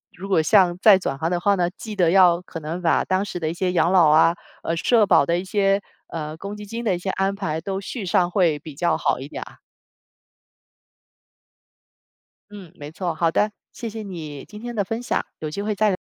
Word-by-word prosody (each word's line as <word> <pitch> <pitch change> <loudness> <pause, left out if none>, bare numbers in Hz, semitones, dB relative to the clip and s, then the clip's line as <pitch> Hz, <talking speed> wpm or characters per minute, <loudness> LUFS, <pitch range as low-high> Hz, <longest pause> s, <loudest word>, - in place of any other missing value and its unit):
如 195 +2 -8
果 185 -5 +3
像 180 0 +4
再 205 -3 +8
转 140 -7 -3
行 160 +2 0
的 175 - 0
话 200 +2 +3
呢， 175 -2 +1
记 220 - -7
得 175 -3 +4
要 180 -2 +5
可 165 -3 -8
能 165 +4 -5
把 170 - +2
当 190 +2 0
时 180 -3 -6
的 155 - -1
一 - - -3
些 180 +1 -1
养 175 0 +2
老 180 -4 +6
啊， 160 +3 +5 0.3
呃 165 - -1
社 225 +4 +3
保 165 - +4
的 170 +3 +1
一 180 - -3
些， 195 0 +1 0.3
呃 155 -1 -6
公 200 +3 -7
积 210 0 -9
金 230 +3 -6
的 190 - +2
一 - - -3
些 190 - -4
安 195 +1 0
排 160 -6 -3
都 190 +3 -4
续 205 +1 -6
上 175 0 +2
会 175 -6 +2
比 155 0 -10
较 170 +3 +1
好 - - 0
一 135 - -7
点 - - -6
啊。 - - -16 2.9
嗯， 195 -5 -11
没 145 -3 -9
错。 175 +1 -3
好 165 +1 +1
的， 210 +6 +1 0.2
谢 230 - -6
谢 220 +1 -7
你， 160 -8 -7
今 210 - -11
天 240 +1 -6
的 205 - +1
分 225 +5 -4
享， - - -1 0.2
有 155 -1 -5
机 200 - -4
会 210 0 -2
再 215 +1 +2
185 Hz, 245 characters per minute, -22 LUFS, 165-200 Hz, 2.9 s, 再